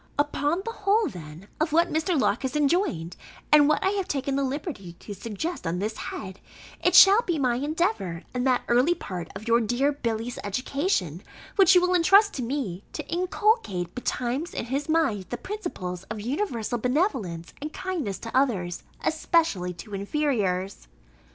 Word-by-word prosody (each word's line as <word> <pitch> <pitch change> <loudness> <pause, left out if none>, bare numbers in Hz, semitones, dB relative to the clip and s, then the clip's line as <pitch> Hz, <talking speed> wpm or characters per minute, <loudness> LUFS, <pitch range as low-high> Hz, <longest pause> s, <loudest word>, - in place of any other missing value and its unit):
Upon 290 +4 0
the 460 - -2
whole, 420 0 +2
then, 165 - -9
of 315 0 0
what 335 +1 +3
Mr. 320 0 +1
Locke 215 - +1
has 265 0 -3
enjoined, 295 - +1 0.4
and 295 -1 +7
what 305 - +2
I 385 - +3
have 390 -2 -1
taken 275 -3 -1
the 275 - +1
liberty 265 - -4
to 205 +4 -9
suggest 220 - -5
on 165 +2 -1
this 215 +4 -2
head, 190 -1 -6 0.4
it - - +3
shall 400 +4 +9
be 350 -9 -1
my 250 -4 +1
endeavour, 225 - -1
in 250 0 -1
that 255 -2 +2
early 250 +9 +3
part 180 - -6
of 210 +4 -8
your 235 +1 +4
dear 245 +6 +1
Billy's 235 -3 -3
education, 205 - -1 0.3
which 385 -2 +6
you 360 - +7
will 360 0 +2
intrust 390 +4 +5
to 260 - -4
me, 230 -7 -3
to - - -6
inculcate 360 - 0
betimes 255 +5 -2
in - - -2
his 275 +5 -3
mind 270 - +1
the - - -3
principles 340 - -5
of 220 +1 -6
universal 240 - -2
benevolence 250 - -1
and 300 +1 -4
kindness 340 - -3
to 230 +3 -8
others, 195 -10 +1 0.2
especially 315 - +1
to 200 +5 -11
inferiors. 200 - -1
265 Hz, 170 wpm, -26 LUFS, 200-330 Hz, 0.4 s, shall